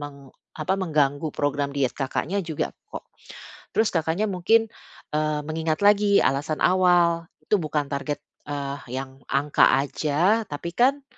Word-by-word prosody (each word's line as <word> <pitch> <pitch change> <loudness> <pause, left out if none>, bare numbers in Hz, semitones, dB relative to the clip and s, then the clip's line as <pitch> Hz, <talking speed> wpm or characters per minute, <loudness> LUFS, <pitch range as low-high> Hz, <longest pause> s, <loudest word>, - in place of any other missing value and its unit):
meng 140 -2 -10 0.3
apa, 170 +5 0
mengganggu 150 -5 0
program 145 0 -1
diet 140 -3 0
Kakaknya 160 +8 -2
juga 160 -3 -3 0.2
kok. - - -8 0.7
Terus 220 - +2
Kakaknya 165 +4 0
mungkin, 225 +5 +2 0.4
eee, 155 0 0
mengingat 160 +2 -2
lagi 205 0 +5
alasan 145 +3 0
awal 175 -2 +3 0.2
itu 210 - +1
bukan 150 -3 -2
target, 145 +1 -3 0.3
eee, 140 -1 -4 0.2
yang 135 0 -6
angka 140 +1 +3
aja 160 +10 +1
tapi 150 +4 -5
kan, 275 +3 +3
155 Hz, 135 wpm, -24 LUFS, 145-185 Hz, 0.7 s, lagi